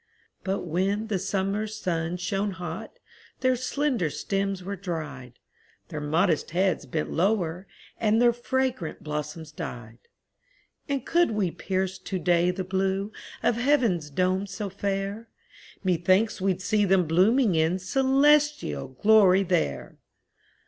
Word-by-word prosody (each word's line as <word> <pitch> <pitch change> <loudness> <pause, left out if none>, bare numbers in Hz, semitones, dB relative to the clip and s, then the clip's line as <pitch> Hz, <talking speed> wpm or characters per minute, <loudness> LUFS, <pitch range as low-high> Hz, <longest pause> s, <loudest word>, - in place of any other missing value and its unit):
But 195 +1 -1
when 195 +6 -1
the 200 -3 0
summer 195 +3 -1
sun 175 -5 -2
shone 195 +3 -2
hot, 180 -1 -7 0.4
Their 255 0 +3
slender 255 - 0
stems 195 +4 -2
were 200 +2 -4
dried; 155 -9 -6 0.6
Their 150 - -5
modest 160 +2 +1
heads 185 +1 0
bent 155 -1 -3
lower, 180 -1 0 0.3
and 220 0 +3
Their 240 0 +5
fragrant 255 - -2
blossoms 150 +1 -5
died; 120 -6 -7 0.9
And 275 -3 -1
could 345 0 +3
we 210 -5 0
pierce 190 +1 -2
to 190 - -4
day 175 0 +2
the 185 +1 -2
blue 190 +2 -1 0.3
Of 230 - +2
heaven's 235 - +2
dome 185 +5 0
so 200 0 -5
fair, 200 +3 -3 0.5
Methinks 185 +4 +2
we'd 190 -1 0
see 210 +2 +2
them 190 -2 +3
blooming 195 - +3
in 160 +2 +2
Celestial 275 - +2
glory 195 +6 +5
there! 70 - -1
190 Hz, 130 wpm, -26 LUFS, 170-215 Hz, 0.9 s, Their